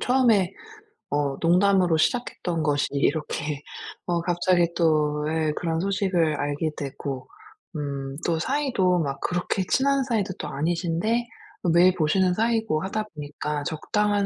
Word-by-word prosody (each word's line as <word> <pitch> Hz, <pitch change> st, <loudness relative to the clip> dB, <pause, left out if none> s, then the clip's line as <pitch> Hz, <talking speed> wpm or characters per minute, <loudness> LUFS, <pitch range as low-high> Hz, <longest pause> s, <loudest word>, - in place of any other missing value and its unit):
처음에 230 Hz, -8 st, +3 dB, 0.6 s
어 145 Hz, -2 st, 0 dB
농담으로 180 Hz, 0 st, +4 dB
시작했던 175 Hz, -4 st, 0 dB
것이 145 Hz, -2 st, +1 dB
이렇게 150 Hz, 0 st, -1 dB, 0.5 s
어 175 Hz, -1 st, +1 dB
갑자기 175 Hz, 0 st, +2 dB
또 155 Hz, -3 st, +2 dB
예 155 Hz, -1 st, 0 dB
그런 165 Hz, -1 st, -1 dB
소식을 185 Hz, -4 st, +1 dB
알게 145 Hz, +2 st, -1 dB
되고. 135 Hz, -1 st, -5 dB, 0.5 s
음. 140 Hz, -2 st, -4 dB
또 165 Hz, -2 st, +1 dB
사이도 220 Hz, -, +1 dB
막 140 Hz, -3 st, -2 dB
그렇게 180 Hz, +2 st, -1 dB
친한 275 Hz, 0 st, +3 dB
사이도 215 Hz, -7 st, -1 dB
또 150 Hz, -, -4 dB
아니신데 170 Hz, +10 st, -1 dB, 0.5 s
매일 180 Hz, +2 st, +6 dB
보시는 180 Hz, +3 st, +2 dB
사이고 225 Hz, -6 st, +1 dB
하다 215 Hz, +3 st, -2 dB
보니까 150 Hz, 0 st, -4 dB
적당한 205 Hz, +6 st, 0 dB
170 Hz, 280 characters per minute, -25 LUFS, 150-200 Hz, 0.6 s, 매일